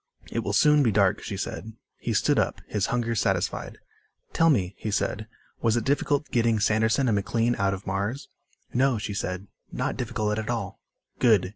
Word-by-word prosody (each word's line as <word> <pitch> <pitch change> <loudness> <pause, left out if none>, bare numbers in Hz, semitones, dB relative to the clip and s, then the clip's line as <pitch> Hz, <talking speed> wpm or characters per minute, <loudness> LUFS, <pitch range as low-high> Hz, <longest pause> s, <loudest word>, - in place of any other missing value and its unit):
"It - - -1
will 100 - -2
soon 150 +7 +5
be 120 -5 +3
dark," 100 -2 +3
she 100 - -5
said. 110 +3 -5 0.3
He - - -2
stood - - +3
up, - - 0
his 105 -2 0
hunger 120 -1 0
satisfied. 110 - -1 0.6
"Tell 165 0 +4
me," 100 - +2
he 110 - -3
said, 110 +1 -1 0.3
"was 115 0 +2
it 115 - 0
difficult 145 +1 0
getting 115 -2 +2
Sanderson 110 +5 +2
and 115 - +3
McLean 115 +4 +1
out 100 0 +2
of 95 - -11
Mars?" 100 +8 -2 0.5
"No," 130 -1 +3
she 105 -1 -4
said. 90 -1 -3 0.3
"Not - - -2
difficult 105 0 -1
at 110 - -4
all." - - -3 0.4
"Good." 110 -7 +4
110 Hz, 180 wpm, -26 LUFS, 100-120 Hz, 0.6 s, soon